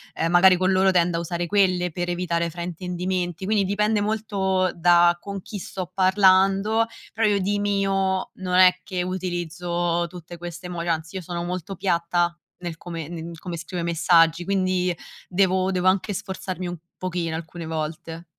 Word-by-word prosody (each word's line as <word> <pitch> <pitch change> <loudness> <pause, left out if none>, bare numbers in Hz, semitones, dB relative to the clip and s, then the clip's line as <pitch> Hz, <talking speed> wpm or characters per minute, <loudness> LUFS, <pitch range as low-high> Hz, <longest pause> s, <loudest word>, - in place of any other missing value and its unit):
ehm, 165 +1 0
magari 180 +1 +7
con 185 +1 +2
loro 190 +1 +4
tendo 175 -2 +2
a - - 0
usare 170 +1 -3
quelle 180 -2 +2
per 175 +2 -3
evitare 170 -1 -1
fraintendimenti, 180 +1 -3
quindi 210 -1 +2
dipende 210 +2 +1
molto 200 -3 0
da 175 0 +5
con 200 -2 -6
chi 205 - -7
sto 185 -1 -6
parlando, 195 +3 +4 0.3
però 220 0 +2
io 205 - +3
di 200 +2 0
mio 195 -2 0
non 185 -1 -3
è 185 0 +6
che 180 -1 -3
utilizzo 175 -1 -2
tutte 175 0 -10
queste 175 +1 -8
emoj 175 -1 -5
anzi 165 +2 -2
io - - -4
sono 170 0 -4
molto 180 +2 -4
piatta 175 -2 +1 0.3
nel 175 -2 -5
come 165 -3 -6
ne 170 -1 -6
in 165 +1 -7
come 175 +1 -6
scrivo 175 +2 -5
i 170 - -2
messaggi 165 0 +3
quindi 185 -1 +1 0.4
devo 185 0 +2
devo 185 0 0
anche 195 +2 +2
sforzarmi 185 -1 -5
un 175 0 -5 0.2
pochino 175 -3 -2
alcune 165 +1 -7
volte. 160 +1 -5
180 Hz, 170 wpm, -24 LUFS, 170-190 Hz, 0.4 s, magari